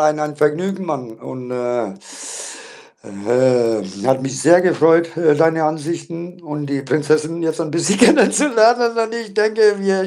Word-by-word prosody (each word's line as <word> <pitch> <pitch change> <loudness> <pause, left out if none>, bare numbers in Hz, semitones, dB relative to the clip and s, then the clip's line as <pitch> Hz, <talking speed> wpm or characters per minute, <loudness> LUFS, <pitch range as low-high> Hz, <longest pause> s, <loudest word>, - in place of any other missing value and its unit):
ein 150 0 +2
ein 150 -1 -4
Vergnügen, 180 +6 -1
Mann 135 -7 -5
und, 125 +1 -10
äh 120 -4 -3 1.1
ähm, 110 -2 -1
hat 130 0 +2
mich 135 0 -5
sehr 175 +4 +5
gefreut, 165 -1 +2
äh, 160 -3 +3
deine 160 +1 +1
Ansichten 165 +3 -5
und 150 -2 -6
die 140 -1 -3
Prinzessin 155 +4 -1
jetzt 160 -1 -2
ein 160 -2 -4
bisschen 170 +6 0
kennenzulernen, 240 -3 +3
und 225 0 -2
ich 230 -3 -7
denke, 215 0 +2
wir 195 -1 -1
160 Hz, 150 wpm, -18 LUFS, 135-190 Hz, 1.1 s, sehr